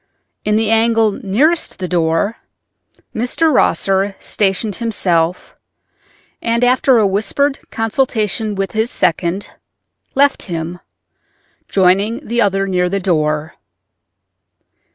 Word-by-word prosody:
In 210 0 +1
the 220 0 +1
angle 225 -1 +3
nearest 270 - 0
the 185 - -4
door 170 +5 0 0.8
Mr. 270 +7 +1
Rosser 195 -4 +1
stationed 200 0 -1
himself, 180 -7 -1 0.9
and 235 +1 0
after 255 +1 +4
a 215 - +4
whispered 220 +8 0
consultation 220 -2 -1 0.2
his 220 +2 0
second 175 +2 -1 0.6
left 280 +1 +3
him, 170 +1 -4 0.9
joining 195 +4 +1
the 235 +1 0
other 195 -1 +1
near 180 -2 0
the 200 +2 -1
door. 155 -3 -1
205 Hz, 100 wpm, -17 LUFS, 180-230 Hz, 0.9 s, after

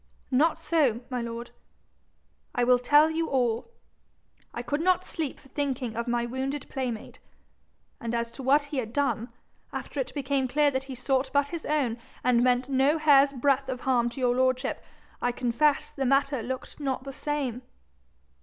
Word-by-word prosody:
'Not 300 +6 +3
so, 275 -9 +1
my 250 -1 -1
lord. 235 0 -6 1.0
I 245 - +2
will 250 0 +5
tell 295 +5 +5
you 325 +1 -1
all. 245 - 0 0.8
I 240 - -5
could 290 +5 -1
not 370 +1 +3
sleep 310 -5 -4
for 270 - -19
thinking 260 -5 -2
of 235 +1 -3
my 240 0 0
wounded 265 +3 -3
playmate. 250 -5 -4 0.8
And 235 0 -3
as 235 0 -2
to 270 - -9
what 280 +3 +4
he 285 0 -6
had 230 -3 -3
done, 260 -4 0 0.4
after 290 - -5
it 260 -1 -2
became 275 -1 0
clear 290 +3 +3
that 265 0 -2
he 270 -1 -7
sought 265 +1 0
but 285 0 +2
his 335 0 -5
own, 265 -6 0 0.2
and 245 -1 +4
meant 250 0 +2
no 275 +3 +3
hair's 285 -3 +5
breadth 270 0 +1
of 255 -1 -3
harm 245 -2 +2
to 255 - -9
your 250 -1 +3
lordship, 255 +1 0 0.4
I 245 - +1
confess 255 +4 +1
the 275 - -3
matter 275 0 +2
looked 260 +5 -6
not 265 -3 -2
the 275 0 -7
same.' 275 -4 -2
265 Hz, 175 wpm, -27 LUFS, 245-285 Hz, 1.0 s, will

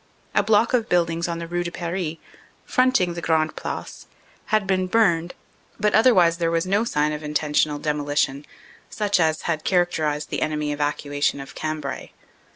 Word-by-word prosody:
A - - +4
block 215 +3 +3
of 235 -3 +1
buildings 170 -1 +1
on 170 -1 -3
the 170 - -5
Rue 175 +1 -2
de 175 - -3
Paris, 170 -1 -4 0.5
front 255 +1 +3
ing 180 -1 0
the 170 - -6
Grande 160 -1 +1
Place, - - -6 0.4
had 215 -3 +1
been 185 -1 0
burned, 180 -5 +2 0.4
but 210 0 +2
otherwise 185 -8 +5
there 165 -1 +1
was 165 +1 0
no 200 +4 +2
sign 150 -9 0
of 150 - -5
intentional 150 0 0
demolition, 145 -1 -1 0.4
such 205 -3 0
as 160 -1 +1
had 160 -2 -2
character 175 -4 +1
ized 150 0 -3
the - - -2
enemy 150 -1 -1
evacuation 145 -1 -1
of 135 - -9
Cambrai. 155 -3 -4
165 Hz, 170 wpm, -23 LUFS, 150-185 Hz, 0.5 s, otherwise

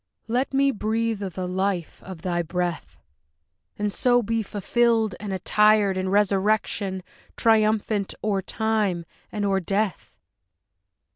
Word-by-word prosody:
Let 245 +4 0
me 275 0 +3
breathe 225 -1 -1
of 190 -4 -5
the 185 -1 -3
life 185 -2 -2
of 180 -4 -10
thy 175 -1 0
breath! 175 +1 -3 0.8
And 210 0 -1
so 245 +3 +3
be 225 +1 0
fulfilled 220 +1 +1
and 205 -1 -5
attired 210 +1 +3
In 185 0 -1
resurrection, 200 -1 +1 0.3
triumphant 215 -2 +2
o'er 200 -2 0
time 210 -4 -1 0.3
and 205 -1 -2
o'er 195 -1 +2
death! 195 +2 -2
205 Hz, 125 wpm, -24 LUFS, 190-220 Hz, 0.8 s, me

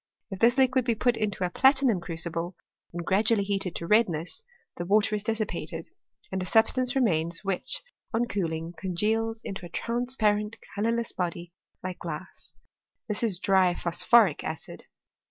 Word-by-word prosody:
If 195 - -5
this 235 +3 +4
liquid 260 -1 +3
be 235 -1 +1
put 245 +2 +2
into 210 -4 -2
a 175 - -3
platinum 265 -5 +4
crucible, 170 +1 -3 0.4
and 170 0 -5
gradually 205 +2 +3
heated 195 -3 -2
to 170 - -4
redness, 180 - +1 0.4
me 175 - -2
water 210 +2 +3
is 205 - -2
dissipated, 190 -7 -2 0.4
and 190 0 -2
a - - -3
substance 250 +5 +3
remains 170 -10 +1
which, 195 - -1 0.3
on 235 +1 +1
cool 195 -8 -2
ing, 165 +1 -5
congeals 220 +6 -1
into 195 -1 -6
a 175 - -8
transparent 220 -1 0 0.2
colourless 230 +3 -1
body 175 -1 -4 0.3
like 185 -1 -5
glass: 165 +1 -8 0.5
this 210 -2 0
is 220 -6 +2
dry 190 -2 +3
phosphoric 175 +1 +3
acid. 160 - -7
200 Hz, 155 wpm, -27 LUFS, 175-225 Hz, 0.5 s, this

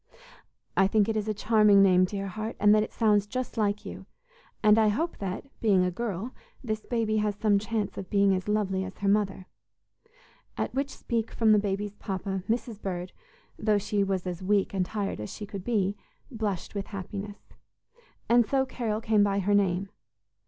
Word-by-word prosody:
"I 195 - +4
think 210 0 +2
it 225 - -1
is 215 0 -1
a 215 - 0
charming 210 -2 +5
name, 185 -1 +5
dear 195 +1 -4
heart, 215 +4 -5
and 205 0 +6
that 215 - +5
it 215 - -3
sounds 210 -3 +2
just 255 +3 -4
like 210 -2 0
you, - - -8 0.6
and 215 +1 +6
I 220 - +4
hope 315 +12 -1
that, 195 +3 -4 0.2
being 195 -5 +4
a 180 - 0
girl, 220 +2 -4 0.3
this 215 -3 -2
baby 225 -3 0
has 210 -1 0
some 205 -1 +2
chance 215 -1 -2
of 190 - -7
being 200 -1 +3
as 185 +1 -2
lovely 200 -3 0
as 190 0 -8
her 200 - -2
mother," 200 -2 +1 1.1
at - - -2
which 275 +1 -1
speech 230 -4 -3
from 225 -2 +2
the 210 - +6
baby's 205 0 -2
papa, 190 0 -3
Mrs. 225 -2 -2
Bird, 180 -1 -4 0.5
though 215 -1 +2
she 205 0 0
was 190 -2 -1
as 180 -1 -4
weak 200 +1 +1
and 185 -2 0
tired 205 - -3
as 105 - -6
she 210 - -7
could 200 -2 -7
be, 205 -4 0 0.4
blushed 210 -6 -3
with 200 -2 -4
happiness. 200 +1 -7 0.7
And 240 +1 +5
so 265 +4 +1
Carol 225 -4 -3
came 215 -2 +3
by 200 -1 +1
her 200 +1 +1
name. 195 -1 +1
205 Hz, 190 wpm, -28 LUFS, 195-220 Hz, 1.1 s, and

